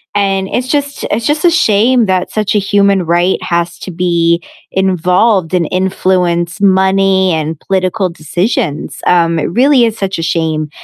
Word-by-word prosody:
And 195 -1 0
it's 250 +1 -2
just 285 0 -2
it's 225 +2 -2
just 300 +2 0
a 350 - +5
shame 235 - +2
that 185 -1 -1
such 215 -1 -1
a 210 - +2
human 200 -1 +2
right 175 +2 +1
has 170 0 -2
to - - -8
be 170 -1 0 0.3
involved 185 0 +1
and 170 -3 0
influence 185 -1 -1
money 190 -1 +2
and 155 0 -3
political 190 0 -1
decisions, 165 - -3
um, 170 -2 +2
it - - -2
really 255 +4 +3
is 225 0 -2
such 190 -3 -3
a - - -2
shame, 160 -2 -1
190 Hz, 160 wpm, -13 LUFS, 170-205 Hz, 0.3 s, a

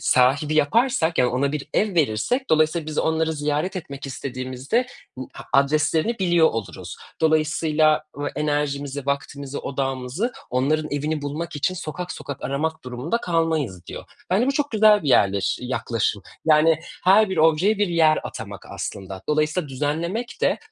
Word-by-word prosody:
sahibi 140 +5 +3
yaparsak 175 - +2
yani 125 - +4
ona 140 +3 0
bir 150 0 -4
ev 210 -2 +1
verirsek 165 - 0
dolayısıyla 155 +1 +2
biz 155 - -4
onları 160 0 +1
ziyaret 150 +5 -1
etmek 140 -5 -7
istediğimizde 130 - -2 0.3
bu 130 - -7
a 130 - 0
adreslerini 155 +9 +1
biliyor 175 -3 +4
oluruz. 100 -7 -6 0.2
Dolayısıyla 155 -1 +2
v 145 0 -2
enerjimizi, 145 -2 -2
vaktimizi, 140 0 -3
odağımızı 135 - -3 0.2
onların 150 +5 +1
evini 150 +1 -2
bulmak 155 +3 -4
için 185 +6 0
sokak 180 0 -5
sokak 140 - -7
aramak 155 +3 -2
durumunda 125 - -2
kalmayız, 160 - -1
diyor. - - -8 0.3
Bence 210 +7 +3
bu 275 - +2
çok 290 +1 -1
güzel 215 -2 +5
bir 150 - -2
yerleş 100 -6 +3
yaklaşım 115 -4 -1 0.2
yani 160 0 +4 0.2
her 200 +3 +6
bir 185 - -2
objeye 165 +7 +3
bir 205 - +2
yer 160 -2 +4
atamak - - -8
aslında. 95 -1 -6
Dolayısıyla 155 +1 0
düzenlemek 165 - -3
de - - +2
155 Hz, 150 wpm, -23 LUFS, 140-170 Hz, 0.3 s, her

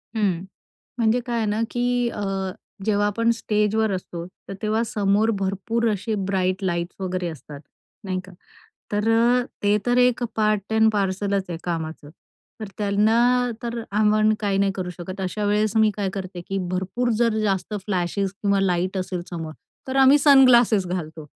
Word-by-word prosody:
हं. 190 -5 0 0.6
म्हणजे 230 +1 +2
काय 240 -1 -2
आहे 225 -2 0
ना, 210 +1 -1
की 245 0 0
अ, 210 - -6 0.6
जेव्हा 205 -1 +2
आपण 230 +3 +1
स्टेजवर 215 -1 0
असतो, 175 -2 -5 0.2
तर - - -5
तेव्हा 215 +1 +1
समोर 210 +1 +1
भरपूर 195 +4 -1
असे 215 +2 -2
ब्राईट 185 -1 0
लाइट्स 170 -1 -2
वगैरे 185 -1 -2
असतात, 150 -3 -9 0.4
नाही 185 -1 -2
का? 190 - -13 0.6
तर 210 +2 0
अ, 240 +2 +4 0.2
ते 205 0 +3
तर 245 0 +2
एक 250 0 +3
पार्ट 215 -1 0
एंड 220 0 +4
पार्सलच 195 -1 0
आहे 170 -2 -4
कामाचं. 160 -3 -4 0.5
तर 215 - -5
त्यांना 210 +2 +2 0.4
तर 235 0 -3
आपण 215 +1 +3
काही 200 -2 0
नाही 195 0 +2
करू 185 -2 -4
शकत. 180 +3 -8
अशावेळेस 210 +3 0
मी 220 -1 +5
काय 200 -2 -1
करते, 185 -2 -6
की 195 - -1
भरपूर 190 +7 -1
जर 230 -2 +2
जास्त 195 0 -1
फ्लॅशेस 190 0 -1
किंवा 200 -1 +2
लाईट 185 0 0
असेल 185 -1 -3
समोर 165 -2 -5 0.4
तर 260 - -2
आम्ही 270 +2 +6
सनग्लासेस 250 -8 +6
घालतो. 160 -3 -5
205 Hz, 160 wpm, -23 LUFS, 185-220 Hz, 0.6 s, आम्ही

